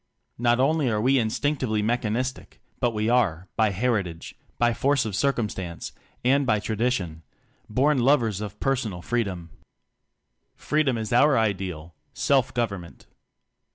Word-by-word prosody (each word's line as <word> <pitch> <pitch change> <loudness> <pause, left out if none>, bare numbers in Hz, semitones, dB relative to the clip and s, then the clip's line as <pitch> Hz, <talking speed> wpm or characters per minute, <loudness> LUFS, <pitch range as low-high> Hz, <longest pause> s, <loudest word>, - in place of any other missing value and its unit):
Not 120 0 +3
only 140 0 +2
are 105 -2 0
we 130 +4 +3
instinctively 115 -1 0
mechanistic, 120 +2 -2 0.2
but 120 - +2
we 110 -1 -2
are 95 -8 +1
by 110 -1 +3
heritage, 100 -5 -2 0.2
by 120 0 +3
force 140 +1 +1
of 105 -3 -3
circumstance, 105 -10 -2 0.3
and 140 +3 +4
by 110 -5 +2
tra 110 +1 -3
dition 100 -9 -1 0.5
born 135 +5 +2
lovers 120 -6 +2
of 105 -1 -7
personal 120 -10 -1
free 120 -1 +1
dom. 85 -4 -7 1.0
Freedom 150 -5 0
is 110 +2 -3
our 140 +3 +5
ideal 95 -7 -2 0.2
self 135 -2 +2
government. 100 -8 -4
115 Hz, 135 wpm, -25 LUFS, 100-130 Hz, 1.0 s, our